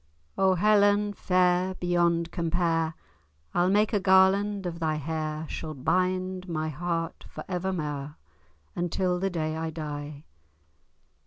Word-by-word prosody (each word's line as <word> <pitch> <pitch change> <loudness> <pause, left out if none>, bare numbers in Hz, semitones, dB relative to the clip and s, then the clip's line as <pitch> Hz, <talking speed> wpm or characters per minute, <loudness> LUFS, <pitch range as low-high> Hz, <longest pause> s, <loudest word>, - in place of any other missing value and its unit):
O 190 -1 +3
Helen 205 +1 +3
fair 180 0 +2
beyond 170 -1 +1
compare, 165 -2 0 0.6
I'll 175 +1 +3
make 210 +3 +2
a 205 - +3
garland 190 +1 +4
of 170 -1 -4
thy 160 -2 0
hair, 155 +1 -3
Shall 155 0 -5
bind 185 +5 -1
my 155 -1 -2
heart 165 +2 -3
for - - -8
evermair, 155 -6 -3 0.6
Until 180 +1 0
the 195 +1 0
day 155 -3 -2
I 160 0 -3
die. 150 -2 -6
175 Hz, 125 wpm, -27 LUFS, 160-190 Hz, 0.6 s, garland